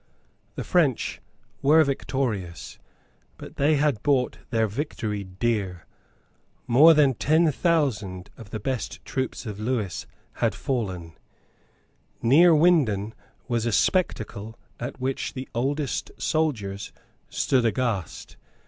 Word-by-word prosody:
The - - -4
French 150 -9 +1 0.4
were 155 +3 +6
victorious; 120 - -3 0.6
but - - -11
they 150 +2 +3
had 145 -6 +1
bought 135 -3 +1
their 115 -2 +2
victory 110 -3 -3
dear. 95 -2 -2 0.8
More 155 +7 +7
than 145 -3 +4
ten 155 +6 +3
thousand 120 - 0
of 110 -3 -12
the 110 - -5
best 125 -1 -4
troops 130 0 -3
of 105 -2 -6
Lewis 110 -5 -2 0.3
had - - +1
fallen. 95 -11 -3 1.1
Neerwinden 150 - +4 0.3
was 120 -2 0
a - - +1
spectacle 110 - 0 0.2
at 120 +2 -6
which 130 +1 -2
the 130 -1 -5
oldest 140 +4 -1
soldiers 110 -12 -1 0.4
stood 130 -2 +1
aghast. 115 - -2
125 Hz, 110 wpm, -25 LUFS, 105-145 Hz, 1.1 s, More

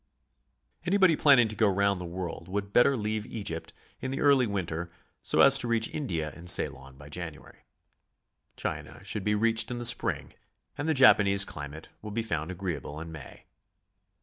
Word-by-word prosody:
Anybody 185 -1 +3
planning 135 -6 +5
to 110 - -5
go 105 0 +3
round 100 -1 +1
the - - -5
world 90 +1 -6
would 100 +1 -4
better 135 +2 +4
leave 110 0 -2
Egypt 100 -7 -5 0.3
in 130 - -4
the 135 - -3
early 140 -4 +4
winter, 85 -4 -4 0.3
so - - +2
as - - +7
to 120 - -2
reaoh 115 -1 0
India 85 - -3
and 85 +1 -1
Ceylon 65 -5 0
by 75 +1 -13
January. 80 0 -9 1.0
China - - -6
should 105 - -4
be 105 +1 +1
reached 115 +1 +1
in 120 - -3
the 120 - -2
spring, 120 - +1 0.4
and 145 +3 -3
the 160 - +2
Japanese 100 -7 +6
climate 75 0 -8
will 105 - -7
be 115 +2 -2
found 80 -7 -3
agreeable 85 -6 -5
in 80 +1 -8
May. 80 -5 -12
100 Hz, 175 wpm, -28 LUFS, 85-120 Hz, 1.0 s, as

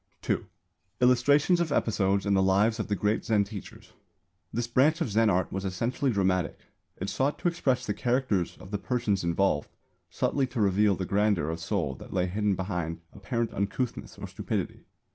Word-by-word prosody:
(2) - - -1 0.5
Illustrations 140 +7 +4
of 170 -3 0
episodes 100 -5 +1
in 100 - +2
the 95 - +4
lives 100 +4 +3
of - - -2
the 105 - 0
great 105 +3 0
Zen 105 -2 +2
teachers. 100 -1 -10 0.6
This 120 +1 -1
branch 135 +7 +3
of 160 -10 -1
Zen 110 +1 +4
art 95 -1 +1
was 95 - -3
essentially 115 +8 -1
dramatic. 95 -5 +1 0.4
It 95 - -4
sought 135 +8 0
to - - -1
express 140 -7 0
the 105 - -1
characters 120 -7 0
of 95 - -12
the 105 - -2
persons 105 -3 0
involved, 85 -3 +1 0.4
subtly 135 -2 0
to 125 -1 -5
reveal 100 0 +3
the 95 - -3
grandeur 100 -5 +1
of 80 - -4
soul 85 -4 -1
that - - -11
lay 90 -2 +1
hidden 100 +2 0
behind 90 -3 -3
apparent 115 +3 -2
uncouthness 105 +5 -3
or - - -6
stupidity. - - -3
105 Hz, 180 wpm, -28 LUFS, 95-125 Hz, 0.6 s, Illustrations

